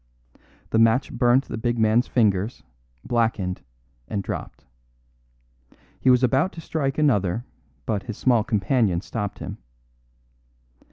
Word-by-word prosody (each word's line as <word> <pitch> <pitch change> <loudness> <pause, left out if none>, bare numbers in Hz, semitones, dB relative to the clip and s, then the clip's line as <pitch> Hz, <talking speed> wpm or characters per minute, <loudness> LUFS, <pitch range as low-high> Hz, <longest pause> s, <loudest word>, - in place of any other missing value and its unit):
The 110 - +3
match 115 +4 +3
burnt 120 +2 +3
the - - -5
big 120 +1 -1
man's 110 +2 +3
fingers, 105 -1 +1 0.4
blackened, 110 -6 0 0.5
and 100 +7 -3
dropped. - - -6 1.3
He 130 - +2
was 125 0 +5
about 135 +9 +2
to - - -9
strike 140 -4 -2
another, 115 - +1 0.4
but 105 -3 -1
his 115 -3 -7
small 120 -4 +3
companion 105 -4 +1
stopped 105 -1 -4
him. - - -7
115 Hz, 120 wpm, -24 LUFS, 105-125 Hz, 1.3 s, was